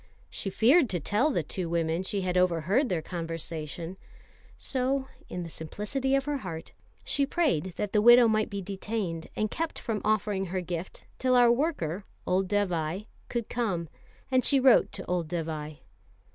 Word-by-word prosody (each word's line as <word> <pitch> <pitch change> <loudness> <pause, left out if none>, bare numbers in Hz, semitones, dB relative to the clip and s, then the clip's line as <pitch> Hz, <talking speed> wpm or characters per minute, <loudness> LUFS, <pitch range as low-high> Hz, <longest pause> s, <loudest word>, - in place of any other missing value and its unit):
She 195 - -4
feared 255 - +4
to 180 - 0
tell 210 - +2
the 285 - 0
two 180 -4 -4
women 165 0 0
she 195 +1 -2
had 180 -1 -1
overheard 180 - +2
their 170 -4 -1
conversation, 165 0 -5 0.6
so 265 +1 -1 0.2
in 180 - -4
the - - -6
simplicity 210 - -2
of 275 -1 +1
her 295 -1 -1
heart 170 -9 -7 0.3
she 280 - +1
prayed 270 - 0
that 205 -1 -3
the 210 - +4
widow 240 +1 +8
might 215 -1 +1
be 200 -1 -4
detained 195 -3 -3
and 215 0 -1
kept 330 0 -3
from 220 -4 -3
offering 210 -2 +1
her 185 +1 -2
gift 175 0 -6
till 255 -1 +3
our 240 -1 +6
worker, 235 - -1 0.2
old 185 +1 +1
Dévai, 185 -2 -1 0.2
could 235 -2 -2
come; 185 -9 -2 0.4
and 255 -1 +4
she 275 - +4
wrote 260 -2 +5
to 190 - -6
old 175 -3 -1
Dévai. 155 -3 -4
195 Hz, 170 wpm, -28 LUFS, 170-240 Hz, 0.6 s, widow